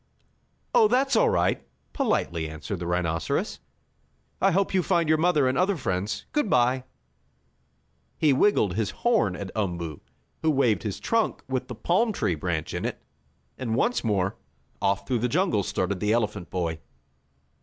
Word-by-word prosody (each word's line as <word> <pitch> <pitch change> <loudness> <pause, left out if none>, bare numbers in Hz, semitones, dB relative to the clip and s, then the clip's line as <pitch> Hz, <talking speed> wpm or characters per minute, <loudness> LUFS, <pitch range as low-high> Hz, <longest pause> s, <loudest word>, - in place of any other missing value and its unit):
"Oh, 470 -3 +6
that's 270 -4 +2
all - - +4
right," 470 - +1 0.3
politely 85 - 0
answered 80 +5 -5
the 85 - -4
rhinoceros. 85 -2 -1 0.8
"I - - +5
hope 195 +3 +1
you 190 - +3
find 170 -2 +1
your 155 0 +3
mother 160 -5 +3
and 130 - +1
other 185 +3 +2
friends. 105 -5 -2
Good 295 -8 0
bye!" 125 -1 +2 1.3
He 150 -3 +4
wiggled 130 - +3
his 110 +1 -1
horn 225 - +1
at 100 0 -6
Umboo, 85 -7 -3 0.4
who 160 - +2
waved 135 -7 +2
his 105 -4 -4
trunk 230 -1 0
with 130 -1 -2
the 125 - -6
palm 215 - +1
tree 90 - 0
branch 80 0 -3
in - - -3
it, - - -3 0.6
and 115 -4 -1
once 235 - +1
more, 100 -3 0 0.4
off 100 0 +1
through 125 -3 0
the 125 - +1
jungle 165 - +2
started 95 0 -2
the 105 +2 +1
elephant 105 -6 -1
boy. 85 -3 -2
120 Hz, 160 wpm, -26 LUFS, -, 1.3 s, Oh